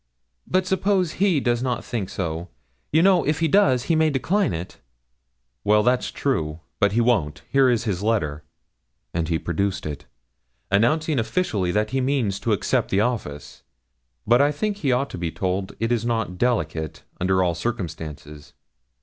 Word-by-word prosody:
'But 185 0 +1
suppose 190 -2 +1
he 190 -6 +3
does 120 -2 0
not 125 -2 -2
think 105 -6 -3
so. 85 -1 -4 0.4
You 160 +2 +4
know, 190 -2 +5
if 150 +2 0
he 165 - +2
does, 155 -9 +4
he 165 - +1
may 160 0 +3
decline 180 +8 +1
it.' 85 +2 -6 0.8
'Well 105 +1 +4
that's 125 +2 +2
true 80 - -2 0.2
but 100 0 +3
he 120 - +3
won't. 80 - +1
Here 135 -1 +5
is 120 -2 +1
his 100 -5 -2
letter' 80 -10 0 0.7
and 85 -1 -1
he 80 - +2
produced 95 +4 -2
it 75 -3 -6 0.6
'announcing 150 +8 +2
officially 110 - 0
that 105 +1 0
he 135 - 0
means 125 -7 0
to 115 - -1
accept 105 - +1
the 95 - +2
office; 75 - -3 0.6
but 120 +4 +5
I 145 +1 +4
think 200 +8 -2
he 140 -9 0
ought 130 +3 0
to - - -6
be 85 -1 -2
told 95 +2 -2
it 115 +1 0
is 120 -2 +1
not 110 -6 -2
delicate, 80 -11 -1 0.2
under 95 +1 +2
all 90 -1 +1
circumstances. 80 -7 -6
115 Hz, 170 wpm, -23 LUFS, 90-140 Hz, 0.8 s, know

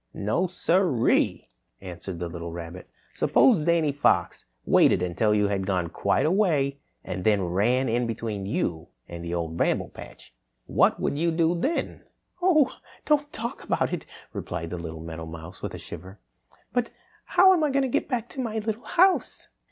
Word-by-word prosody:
"No 110 - 0
sir 175 -6 +1
e - - +6
e!" - - -2 0.3
answered 90 -1 -7
the 85 0 -3
little 85 0 -6
rabbit. 85 +2 -8 0.2
"Suppose 225 -11 +4
Danny 165 -1 +2
Fox 140 +1 +1 0.2
waited 90 - +4
until 90 +5 +1
you 105 -1 +3
had 95 -2 -1
gone 90 -4 0
quite - - +1
a 155 - +2
way 150 -9 +1 0.2
and 90 0 -5
then 105 -2 +3
ran 115 +9 +1
in 120 +1 0
between 110 -3 -4
you 100 - -2 0.2
and 85 0 -8
the 85 0 -3
Old 85 -1 -3
Bramble - - +1
Patch. - - -13 0.3
What - - +3
would 145 - -1
you 170 +1 +2
do 165 0 +2
then?" 270 - -2 0.4
"Oh, 310 -7 +4 0.3
don't 295 -1 +2
talk 235 +1 -5
about - - 0
it," - - -4 0.3
replied 80 0 -5
the 90 - -4
little 80 -1 -7
meadowmouse 80 +1 -8
with - - -5
a - - -6
shiver. 95 +4 -10 0.6
"But 245 -1 0 0.4
how 375 +1 +6
am 340 -4 +2
I 300 - +2
to 275 -1 +1
get 250 - -1
back 240 -4 -1
to 265 - -5
my 225 -3 -3
little 220 +1 -3
house?" 370 +2 +2
115 Hz, 175 wpm, -26 LUFS, -, 0.6 s, e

